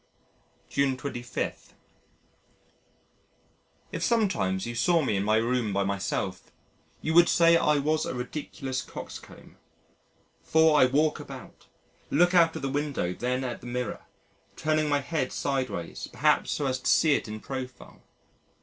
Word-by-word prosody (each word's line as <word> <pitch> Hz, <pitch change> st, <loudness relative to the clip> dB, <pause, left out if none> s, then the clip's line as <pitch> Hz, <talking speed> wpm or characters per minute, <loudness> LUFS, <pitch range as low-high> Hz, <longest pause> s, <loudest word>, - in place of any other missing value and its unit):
June 140 Hz, -2 st, +1 dB
25. 125 Hz, -3 st, -5 dB, 2.2 s
If 165 Hz, -, -4 dB
sometimes 170 Hz, -, +1 dB
you 120 Hz, -, -4 dB
saw 165 Hz, +7 st, +2 dB
me 110 Hz, -, 0 dB
in 95 Hz, -, 0 dB
my 110 Hz, +1 st, +2 dB
room 115 Hz, -1 st, 0 dB
by 100 Hz, 0 st, +1 dB
myself, 95 Hz, -1 st, -3 dB, 0.5 s
you 160 Hz, -, 0 dB
would 175 Hz, +1 st, +7 dB
say 170 Hz, 0 st, +5 dB
I 150 Hz, -2 st, +3 dB
was 155 Hz, +2 st, 0 dB
a -, -, -4 dB
ridiculous 130 Hz, 0 st, -4 dB
coxcomb. -, -, -10 dB, 0.8 s
For 160 Hz, -1 st, +4 dB
I 130 Hz, -, +7 dB
walk 150 Hz, +4 st, +1 dB
about, -, -, -11 dB, 0.4 s
look 175 Hz, +5 st, +3 dB
out 165 Hz, -2 st, +5 dB
of -, -, -6 dB
the -, -, 0 dB
window 140 Hz, -10 st, -1 dB
then 125 Hz, +5 st, -2 dB
at 125 Hz, -2 st, -4 dB
the -, -, -9 dB
mirror 125 Hz, 0 st, -4 dB, 0.5 s
turning 155 Hz, -1 st, 0 dB
my 145 Hz, -1 st, +2 dB
head 140 Hz, -2 st, -2 dB
sideways 130 Hz, -11 st, -3 dB
perhaps -, -, +2 dB
so 145 Hz, -, -1 dB
as 130 Hz, -1 st, 0 dB
to -, -, -1 dB
see 155 Hz, -3 st, +5 dB
it -, -, -1 dB
in 110 Hz, 0 st, -6 dB
profile. 130 Hz, +1 st, -8 dB
135 Hz, 145 wpm, -27 LUFS, 120-155 Hz, 2.2 s, would